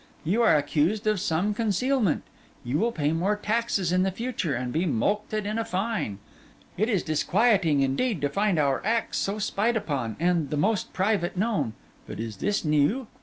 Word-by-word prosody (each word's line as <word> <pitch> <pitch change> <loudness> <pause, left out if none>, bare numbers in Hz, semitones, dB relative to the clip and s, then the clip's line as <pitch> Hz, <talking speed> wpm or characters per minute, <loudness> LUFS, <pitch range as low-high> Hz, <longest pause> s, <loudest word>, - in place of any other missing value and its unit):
You 195 +9 +1
are 225 - +5
accused 155 +9 0
of 215 -2 +2
some 175 +6 0
concealment. 225 - +1 0.4
You 125 +5 -1
will 235 +4 +1
pay 150 -8 0
more 185 +6 +1
taxes 210 -4 0
in 180 0 +3
the 190 - +2
future, 190 - -2
and 125 0 -3
be 175 +3 +1
mulcted 205 - -1
in 215 +2 -2
a - - 0
fine. 195 - -2 0.6
It 215 +5 0
is 205 -6 +1
disquieting, 170 - +2
indeed, 175 - 0
to 145 - +1
find 200 +2 +1
our 140 -3 +1
acts 225 +2 0
so 200 +2 -1
spied 215 +2 0
upon, 140 - -3
and 170 -4 +1
the 150 - -2
most 205 +7 0
private 190 -2 0
known. 205 - 0 0.3
But - - -7
is 110 -2 -5
this 205 - -1
new? 155 - +2
190 Hz, 180 wpm, -26 LUFS, 150-215 Hz, 0.6 s, are